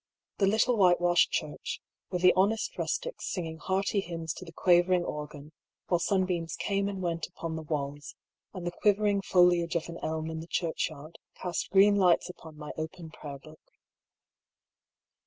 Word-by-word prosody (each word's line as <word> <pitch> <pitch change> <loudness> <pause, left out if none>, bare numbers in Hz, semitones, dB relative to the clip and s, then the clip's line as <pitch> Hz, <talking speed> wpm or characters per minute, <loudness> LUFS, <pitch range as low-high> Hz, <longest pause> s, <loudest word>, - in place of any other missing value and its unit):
The 195 - +4
little 225 +4 +3
whitewashed 175 -2 +4
church, - - -3 0.3
with 180 -1 -3
the 180 - +7
honest 205 +4 +1
rustics - - -3
singing 165 -3 -4
hearty 195 +3 0
hymns 165 -4 -4
to - - -9
the 170 - -10
quavering 175 +1 +3
organ, 150 0 -6 0.4
while 175 - +3
sunbeams 180 -3 0
came 200 0 -1
and 195 -2 -5
went 165 -2 -2
upon 165 -1 -6
the 160 - -4
walls, 145 -2 -4 0.4
and 185 -3 -7
the 175 - -1
quivering 205 +1 +2
foliage 175 -2 +3
of 170 0 -1
an 170 - -7
elm 160 0 -2
in 160 - -4
the 165 - -8
churchyard 160 -3 -3 0.2
cast 180 -2 -3
green 200 +1 +6
lights 180 -1 +3
upon 160 -3 -14
my 150 -1 -7
open 160 +1 -6
prayer 145 -2 -8
book. 155 +3 -15
175 Hz, 160 wpm, -29 LUFS, 160-190 Hz, 0.4 s, the